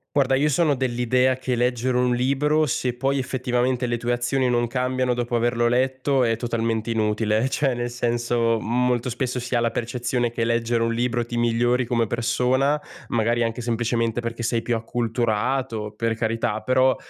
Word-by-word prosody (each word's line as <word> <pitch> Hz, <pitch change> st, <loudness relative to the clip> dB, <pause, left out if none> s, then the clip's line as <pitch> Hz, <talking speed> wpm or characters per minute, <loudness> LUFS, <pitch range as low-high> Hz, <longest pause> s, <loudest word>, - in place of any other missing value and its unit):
Guarda, 135 Hz, -2 st, +3 dB
io 145 Hz, +3 st, +3 dB
sono 150 Hz, 0 st, +2 dB
dell'idea 125 Hz, 0 st, +1 dB
che 130 Hz, -1 st, -2 dB
leggere 125 Hz, +1 st, 0 dB
un 125 Hz, 0 st, +2 dB
libro, 145 Hz, +5 st, +2 dB
se 125 Hz, -2 st, -1 dB
poi 135 Hz, +2 st, 0 dB
effettivamente 125 Hz, -1 st, -1 dB
le 120 Hz, 0 st, -1 dB
tue 120 Hz, +1 st, -1 dB
azioni 125 Hz, +1 st, 0 dB
non 120 Hz, 0 st, +2 dB
cambiano 125 Hz, +1 st, 0 dB
dopo 120 Hz, 0 st, -2 dB
averlo 120 Hz, 0 st, +1 dB
letto, 130 Hz, +2 st, +1 dB
è 115 Hz, -1 st, +2 dB
totalmente 115 Hz, -1 st, -2 dB
inutile. 110 Hz, +1 st, +1 dB
Cioè, 135 Hz, -3 st, 0 dB
nel 120 Hz, 0 st, -3 dB
senso, 120 Hz, -1 st, 0 dB
molto 125 Hz, +1 st, 0 dB
spesso 125 Hz, +1 st, -2 dB
si 125 Hz, +1 st, -5 dB
ha -, -, +3 dB
la 115 Hz, 0 st, +1 dB
percezione 120 Hz, 0 st, -2 dB
che 115 Hz, -1 st, -2 dB
leggere 115 Hz, 0 st, 0 dB
un 115 Hz, 0 st, +1 dB
libro 120 Hz, 0 st, 0 dB
ti 120 Hz, 0 st, -5 dB
migliori 120 Hz, +1 st, +2 dB
come 115 Hz, -2 st, 0 dB
persona, 130 Hz, +5 st, +1 dB, 0.3 s
magari 120 Hz, +1 st, +1 dB
anche 115 Hz, +1 st, -2 dB
semplicemente 115 Hz, 0 st, -1 dB
perché 115 Hz, 0 st, -4 dB
sei 115 Hz, 0 st, 0 dB
più 120 Hz, -, 0 dB
acculturato, 115 Hz, 0 st, -1 dB
per 115 Hz, 0 st, -1 dB
carità. 115 Hz, -1 st, -1 dB
Però 130 Hz, +2 st, +3 dB
120 Hz, 170 wpm, -23 LUFS, 115-130 Hz, 0.3 s, Guarda